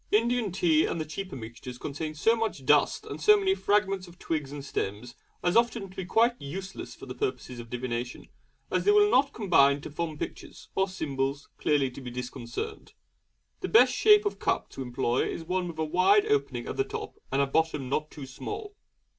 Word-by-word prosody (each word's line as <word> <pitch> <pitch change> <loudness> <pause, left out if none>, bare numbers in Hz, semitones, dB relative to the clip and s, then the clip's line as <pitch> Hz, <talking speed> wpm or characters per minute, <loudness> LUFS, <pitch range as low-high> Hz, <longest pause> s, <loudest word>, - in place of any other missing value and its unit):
Indian 230 0 +2
tea 165 -4 +3
and 170 - -2
the 155 - -2
cheaper 185 +5 -6
mixtures 120 +1 -8
contain 155 +4 -5
so 225 +9 +3
much 220 - -3
dust 145 +1 +3
and - - -7
so 425 0 +7
many 385 -1 +2
fragments 195 - +1
of 175 0 -15
twigs 150 -6 -3
and 145 -1 -7
stems 115 0 -4 0.3
as 175 +2 +2
often 230 -4 +2
to - - -16
be 190 - -4
quite 230 +6 +3
useless 190 +7 -6
for - - -11
the - - -6
purposes 395 - -3
of 115 -1 -9
divination, 125 0 -4 0.4
as - - +1
they - - +3
will 415 0 +5
not 275 +2 +4
combine 145 -10 +4
to 155 - -8
form 160 0 -3
pictures, - - -7
or 190 0 +1
symbols 140 -5 -3
clearly 145 -3 +2
to 130 - -10
be 125 - -6
discerned. 125 -1 -6 0.7
The - - -3
best 445 - +6
shape 420 0 +6
of 410 - -2
cup - - -1
to - - -7
employ 125 -1 0
is 165 - -4
one 180 +2 -1
with 170 -2 -7
a 160 - 0
wide 185 - +4
opening 430 -1 0
at - - -5
the 400 - +3
top 425 0 -7
and 135 - +1
a 140 - +4
bottom 150 -1 0
not 150 +4 -1
too 145 - -9
small. 415 - -6
160 Hz, 205 wpm, -28 LUFS, 135-225 Hz, 0.7 s, so